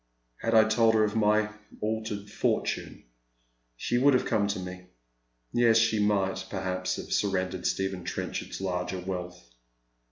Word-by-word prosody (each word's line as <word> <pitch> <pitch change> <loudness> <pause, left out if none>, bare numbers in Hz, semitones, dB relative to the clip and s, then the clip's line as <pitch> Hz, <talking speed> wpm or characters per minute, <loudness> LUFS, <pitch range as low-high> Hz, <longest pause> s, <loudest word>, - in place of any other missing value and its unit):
Had 115 0 0
I 110 - +8
told 110 +1 +3
her 110 - +4
of 105 0 0
my 105 0 +3 0.3
altered 110 -2 -3
fortunes - - -2 0.7
she 120 - 0
would 140 +1 +5
ave 125 - +1
come 105 -3 +1
to 100 -1 -2
me. 90 0 -8 0.7
Yes, 115 -2 +5
she 110 -1 +3
might, 95 -2 +1
perhaps, 95 -1 -2
have - - -5
surrendered 95 -2 0
Stephen 95 -2 -2
Trenchard's - - -4
larger 90 0 -2
wealth. 90 -1 -6
100 Hz, 140 wpm, -28 LUFS, 95-110 Hz, 0.7 s, I